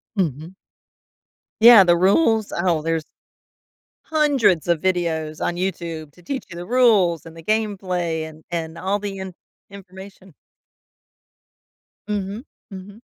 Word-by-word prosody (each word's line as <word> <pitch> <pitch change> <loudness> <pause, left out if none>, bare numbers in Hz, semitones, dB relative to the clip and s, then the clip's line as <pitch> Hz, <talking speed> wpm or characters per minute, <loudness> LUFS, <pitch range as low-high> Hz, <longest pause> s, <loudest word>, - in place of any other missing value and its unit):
Mhm. 165 - -3 1.1
Yeah, 230 -3 +9
the 175 -1 +4
rules? 215 - +2
Oh, 170 -3 +1
there's 165 0 -1 1.1
hundreds 280 - +2
of 170 -2 +2
videos 165 -4 -1
on 175 - -1
YouTube 170 -4 -4
to 180 - -20
teach 265 +10 -5
you - - -8
the 175 +1 -7
rules, 210 -8 +3
and 165 0 -12
the 165 - -11
gameplay, 185 -6 -2
and 155 0 -16
and 165 -1 -4
all 190 +4 -1
the 200 -1 -5
in 190 -1 -7 0.4
information 190 0 -13 1.8
Mhm, 205 +3 -4 0.2
mhm. 200 +2 -11
185 Hz, 125 wpm, -21 LUFS, 165-205 Hz, 1.8 s, Yeah